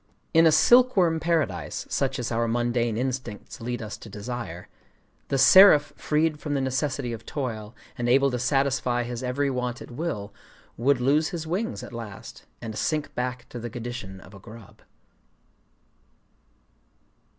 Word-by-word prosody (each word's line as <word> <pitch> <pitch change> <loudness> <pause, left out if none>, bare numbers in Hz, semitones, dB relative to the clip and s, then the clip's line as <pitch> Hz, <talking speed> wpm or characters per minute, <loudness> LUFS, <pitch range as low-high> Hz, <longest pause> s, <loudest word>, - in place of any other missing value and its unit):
In 165 0 +6
a - - +5
silkworm 185 -3 +5
paradise 155 - -1
such 135 0 -1
as 120 -2 -3
our 115 0 0
mundane 120 -1 0
instincts 125 -5 -4
lead 120 0 -4
us 105 - -6
to 110 - -12
desire, 105 -4 -6 0.6
the 135 - 0
seraph 150 +1 +7
freed 150 0 0
from 150 -2 -3
the - - +1
necessity 130 -1 -1
of 115 - -8
toil, 115 -6 -5 0.2
and 120 0 0
able 135 +2 +4
to 125 - -2
satisfy 130 -2 +1
his 120 0 -5
every 135 +2 -1
want 125 -1 -3
at - - -11
will, 120 -8 -4 0.4
would 135 +2 +2
lose 145 +5 +2
his 170 -4 -5
wings 200 +9 -3
at - - -10
last, 110 -4 -9 0.2
and 110 -2 -5
sink 155 +4 -2
back 125 0 -4
to 120 - -7
the 120 +1 -5
condition 115 -5 -7
of 100 - -15
a 100 - -12
grub…. 110 +1 -14
125 Hz, 155 wpm, -25 LUFS, 115-145 Hz, 0.6 s, seraph